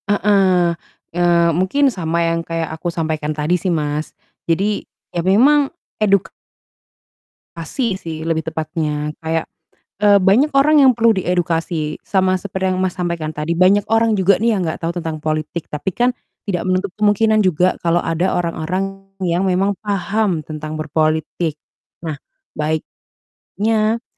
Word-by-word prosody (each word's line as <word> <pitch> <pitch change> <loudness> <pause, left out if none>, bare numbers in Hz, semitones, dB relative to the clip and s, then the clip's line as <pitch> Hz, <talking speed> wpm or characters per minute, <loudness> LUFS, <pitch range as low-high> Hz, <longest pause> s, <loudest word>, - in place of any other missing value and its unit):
Heeh. 195 -4 +3 0.4
Eee, 170 -1 +3
mungkin 260 - +2
sama 170 -4 -1
yang 165 0 +1
kayak 165 -1 -3
aku 160 +2 -5
sampaikan 155 -2 -2
tadi 155 +4 0
sih, 185 - -4
Mas. 150 -2 -2 0.3
Jadi, 195 +5 0 0.2
ya 175 - -3
memang 265 - +4 1.7
edukasi 190 - -4
sih 160 -4 -7
lebih 160 0 -1
tepatnya. 155 -2 -2
Kayak, 160 0 -2 0.5
eee, 205 -1 +6
banyak 200 +10 +4
orang 300 +2 +5
yang 265 -1 +7
perlu 230 -1 +4
diedukasi, 165 -3 -1
sama 185 -1 +1
seperti 190 0 -2
yang, 185 - -1
Mas, 185 -1 -1
sampaikan 170 -4 -2
tadi. 150 +2 -2
Banyak 185 +4 +4
orang 225 -1 +3
juga 190 0 +3
nih 225 -1 +2
yang 185 - -1
nggak 160 +1 -3
tahu 170 +1 -3
tentang 160 -2 -4
politik, 155 +1 -3
tapi 150 +6 -3
kan 245 +6 +2 0.4
tidak 180 -4 -1
menutup 185 +1 0
kemungkinan 215 +1 +3
juga 180 0 +2
kalau 170 +1 +3
ada 165 +3 0
orang 170 -1 -1
orang 180 +4 -1 0.4
yang 180 0 0
memang 190 +2 +1
paham 200 -2 0
tentang 155 0 -6
berpolitik. 155 0 -1 0.4
Nah 160 -3 -4 1.2
baiknya, 220 +2 0
175 Hz, 140 wpm, -19 LUFS, 160-200 Hz, 1.7 s, yang